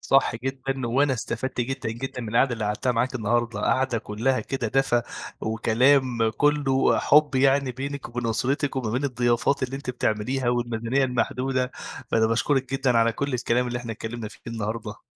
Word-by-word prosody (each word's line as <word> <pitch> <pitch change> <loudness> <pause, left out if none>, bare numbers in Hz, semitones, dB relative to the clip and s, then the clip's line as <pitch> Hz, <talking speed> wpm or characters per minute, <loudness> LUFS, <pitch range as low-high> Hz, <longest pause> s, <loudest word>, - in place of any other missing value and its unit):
صح 135 -3 +2
جدًا، 135 +1 -3
وأنا 135 +4 +2
استفدت 125 +1 -3
جدًا، 130 -1 -2
جدًا 130 +2 -5
من 115 - -5
القعدة 120 +4 +3
اللي 110 -2 -3
قعدتها 105 +5 0
معاكِ 125 +3 0
النهارده، 120 -2 0
قعدة 130 +2 +1
كلّها 115 +5 -1
كده 125 -5 -3
دفى، 125 -1 +2 0.4
وكلام 115 +2 +2
كلّه 145 -2 +3
حُب 150 -1 +4
يعني 135 0 +3
بينِك 140 +3 -5
وبين 120 0 -3
أسرتِك، 135 +6 0
وما 120 -5 -1
بين 125 +5 -1
الضيافات 125 +1 +1
اللي 130 +1 -2
أنتِ 135 -2 -4
بتعمليها، 120 +2 -1
والميزانيّة 120 +2 0
المحدودة، 125 +1 -1 0.4
فأنا 110 0 +3
باشكرِك 125 +3 0
جدًا 130 -3 +2
على 115 0 +3
كُلّ 140 +2 -2
الكلام 125 0 +1
اللي 120 - -2
إحنا 120 -1 -5
اتكلّمنا 110 0 -6
فيه 105 - -16
النهارده. 115 -1 -5
125 Hz, 165 wpm, -25 LUFS, 115-135 Hz, 0.4 s, حُب